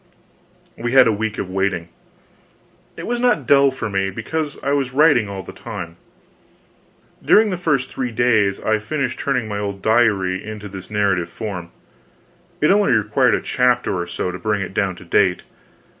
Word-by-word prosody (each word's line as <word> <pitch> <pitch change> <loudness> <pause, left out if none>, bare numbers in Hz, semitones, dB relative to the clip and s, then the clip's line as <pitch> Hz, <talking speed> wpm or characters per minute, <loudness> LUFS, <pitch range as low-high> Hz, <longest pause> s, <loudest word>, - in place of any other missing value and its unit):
We 120 +1 -2
had 130 -1 +7
a 115 - +3
week 110 0 -3
of - - -3
waiting. 95 -3 -1 1.1
It - - -6
was 240 0 -2
not 240 - +2
dull 140 +1 +5
for 130 -4 -5
me, 95 -1 -1
because 145 +9 -4
I 140 - 0
was 135 -3 0
writing 140 -7 +4
all 95 -1 -6
the - - -10
time. 95 -8 -7 1.3
During 215 -1 +5
the - - -1
first 150 -7 0
three 125 -2 -3
days, 110 -4 +2
I 110 0 0
finished 130 +3 -3
turning 125 -5 -1
my 105 -1 -3
old 100 -1 -5
diary 105 -5 +2
into 105 -1 -7
this 95 -1 -10
narrative 100 -5 0
form; 90 -4 -6 0.9
it 150 - +4
only 205 +1 +3
required 105 -2 +2
a - - -2
chapter 125 -4 +1
or 85 -1 -3
so 90 +1 -3
to 90 - -7
bring 105 +1 -1
it 90 - -7
down 95 -1 0
to 90 - -13
date. 85 - +2
110 Hz, 175 wpm, -20 LUFS, 95-130 Hz, 1.3 s, had